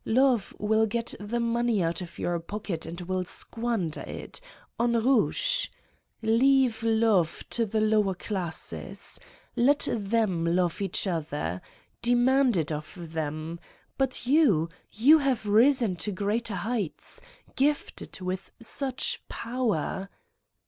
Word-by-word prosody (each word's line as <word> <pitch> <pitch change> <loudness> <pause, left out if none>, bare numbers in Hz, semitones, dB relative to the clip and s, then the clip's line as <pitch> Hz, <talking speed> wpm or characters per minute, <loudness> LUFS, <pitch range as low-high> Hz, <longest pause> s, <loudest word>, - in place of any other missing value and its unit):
Love 245 -2 +2
will 220 +1 +2
get 230 +2 -2
the 210 +4 -3
money 235 -3 +1
out 165 +2 -1
of 175 - -9
your 175 -1 -1
pocket 195 -1 -5
and 170 +2 -6
will 185 +1 -2
squander 225 -3 -2
it... - - -7 0.4
on 235 0 +2
rouge! 270 - +3 0.6
Leave 240 +1 +3
love 220 -6 +2
to 230 -2 +1
the 215 +2 0
lower 215 -3 +2
classes. 180 -4 -2 0.4
Let 280 +4 +3
them 210 -5 0
love 175 +2 +1
each 195 - 0
other. 150 - -2 0.4
Demand 245 0 +3
it 160 0 -1
of 155 +2 -6
them, 155 +1 -3 0.4
but 265 -2 -1
you, 245 - +4 0.2
you 285 +9 +6
have 265 -6 0
risen 225 -1 +4
to 210 - -2
greater 205 +3 -1
heights, 205 -2 -4 0.3
gifted 285 -7 -1
with 185 +1 -4
such 255 +3 -1
power! 220 -6 -2
215 Hz, 120 wpm, -27 LUFS, 180-240 Hz, 0.6 s, you